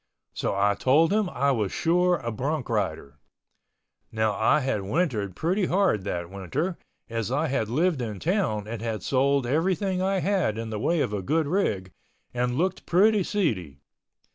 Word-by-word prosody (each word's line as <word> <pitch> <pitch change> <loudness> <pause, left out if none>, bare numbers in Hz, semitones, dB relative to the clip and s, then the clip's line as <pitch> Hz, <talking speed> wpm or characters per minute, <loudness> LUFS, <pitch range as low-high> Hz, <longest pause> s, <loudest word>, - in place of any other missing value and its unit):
So - - -2
I 100 +1 +3
told 155 - +3
him 210 -3 +1
I 140 -2 +1
was 110 -7 0
sure 180 +2 +2
a 120 -6 -4
bronc 140 +5 -3
rider. 80 -10 -2 0.9
Now 110 -1 +1
I 110 +9 +3
had 130 -6 -1
wintered 105 - -1
pretty 180 - 0
hard 180 - +1
that 85 -3 -3
winter 100 - -3 0.3
as 115 -1 -3
I 145 +4 +1
had 120 -6 -1
lived 155 +3 +1
in 110 -5 -4
town 160 - 0
and 115 -1 -5
had 115 -2 -3
sold 140 0 +2
everything 180 - 0
I 195 +1 +1
had 185 - 0
in 115 0 -5
the 105 - -3
way 165 +7 +1
of 105 - -1
a 100 - -2
good 155 - +1
rig 105 - -1 0.4
and 125 0 -1
looked 185 +3 -1
pretty 205 +4 +4
seedy. 110 - -1
130 Hz, 170 wpm, -26 LUFS, 105-175 Hz, 0.9 s, pretty